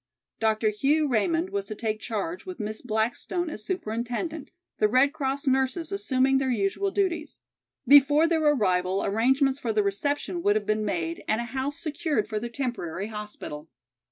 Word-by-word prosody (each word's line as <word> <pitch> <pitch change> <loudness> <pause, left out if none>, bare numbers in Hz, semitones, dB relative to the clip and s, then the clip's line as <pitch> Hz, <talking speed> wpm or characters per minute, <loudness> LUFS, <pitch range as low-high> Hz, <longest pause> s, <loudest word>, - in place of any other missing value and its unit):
Dr. 220 0 +2
Hugh 290 +8 +2
Raymond 330 - +1
was 400 0 -2
to 215 - -6
take 215 0 -2
charge 235 - -4
with 370 -5 -8
Miss 215 0 -4
Blackstone 245 +9 -1
as 215 - -7
superintendent, 270 - -3 0.3
the 215 - +5
Red 260 +6 +3
Cross 280 0 -2
nurses 265 +6 +1
assuming 270 -9 +2
their 265 -1 0
usual 225 - 0
duties. 365 -5 -1 0.5
Before 290 +3 +7
their 330 -1 +1
arrival 190 -10 +2
arrangements 265 +6 +2
for 235 - -1
their 210 -1 +2
reception 285 - -1
would 205 -9 +3
have 215 -1 0
been 215 0 0
made 165 -4 -2
and 215 - +1
a - - -1
house 265 +4 -3
secured 305 -7 -1
for 215 -1 -2
their 235 +2 -5
temporary 225 -7 -4
hospital. 210 -8 -7
255 Hz, 165 wpm, -26 LUFS, 215-300 Hz, 0.5 s, Before